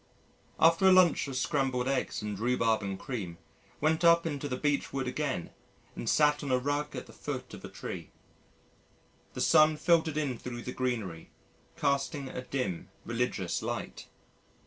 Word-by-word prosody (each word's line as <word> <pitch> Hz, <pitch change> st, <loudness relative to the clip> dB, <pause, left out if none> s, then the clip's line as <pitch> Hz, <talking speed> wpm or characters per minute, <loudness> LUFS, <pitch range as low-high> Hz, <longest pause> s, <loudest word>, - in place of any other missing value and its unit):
After 165 Hz, +4 st, +5 dB
a -, -, +8 dB
lunch 185 Hz, -5 st, +5 dB
of 135 Hz, -, -5 dB
scrambled 130 Hz, -2 st, 0 dB
eggs 130 Hz, -4 st, -1 dB
and 105 Hz, -2 st, -4 dB
rhubarb 115 Hz, -2 st, +2 dB
and 100 Hz, -1 st, -3 dB
cream 100 Hz, -11 st, -5 dB, 0.4 s
went 160 Hz, +3 st, +1 dB
up 170 Hz, 0 st, +6 dB
into 145 Hz, -2 st, -3 dB
the 125 Hz, -, -2 dB
Beech 145 Hz, 0 st, 0 dB
Wood 135 Hz, -1 st, -2 dB
again 130 Hz, -, -2 dB, 0.4 s
and 115 Hz, -, -3 dB
sat 150 Hz, -1 st, +3 dB
on 140 Hz, -, -4 dB
a 130 Hz, -, +3 dB
rug 145 Hz, +3 st, -2 dB
at -, -, -5 dB
the -, -, -15 dB
foot -, -, -6 dB
of -, -, -10 dB
a -, -, -7 dB
tree. -, -, -7 dB, 1.3 s
The -, -, -3 dB
sun 155 Hz, 0 st, +5 dB
filtered 160 Hz, -2 st, +2 dB
in 135 Hz, -6 st, -1 dB
thro' 120 Hz, -1 st, -6 dB
the 125 Hz, -, -5 dB
greenery 115 Hz, -11 st, -3 dB, 0.5 s
casting 140 Hz, -1 st, 0 dB
a 125 Hz, -, -5 dB
"dim, 125 Hz, -9 st, -3 dB, 0.2 s
religious 115 Hz, -7 st, -1 dB
light." -, -, -5 dB
135 Hz, 165 wpm, -30 LUFS, 120-150 Hz, 1.3 s, a